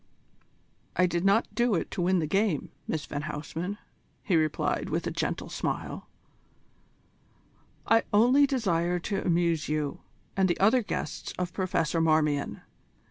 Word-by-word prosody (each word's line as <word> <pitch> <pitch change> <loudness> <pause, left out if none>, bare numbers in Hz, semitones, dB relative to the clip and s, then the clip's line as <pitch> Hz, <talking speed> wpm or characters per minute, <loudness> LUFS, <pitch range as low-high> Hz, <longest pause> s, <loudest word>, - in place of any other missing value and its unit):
"I 185 - +4
did 175 -1 -1
not 200 +4 +3
do 240 -3 +2
it 165 - -2
to 190 - -3
win 185 +2 +3
the 165 - +1
game, 195 0 0 0.2
Miss 155 -1 -2
van 145 - -4
Huysman," 160 +6 -4 0.5
he 185 - +1
replied 155 -1 0
with - - -1
a - - -1
gentle - - -2
smile; - - -4 1.8
"I 225 0 +5
only 250 +7 +5
desired 180 - 0
to 200 - -2
amuse 170 -3 +1
you 150 -2 -1 0.4
and 190 -1 +3
the 175 - 0
other 220 +6 +5
guests 210 - -4
of 180 -1 -3
Professor 175 -4 0
Marmion. 155 -3 +1
175 Hz, 140 wpm, -28 LUFS, 160-200 Hz, 1.8 s, I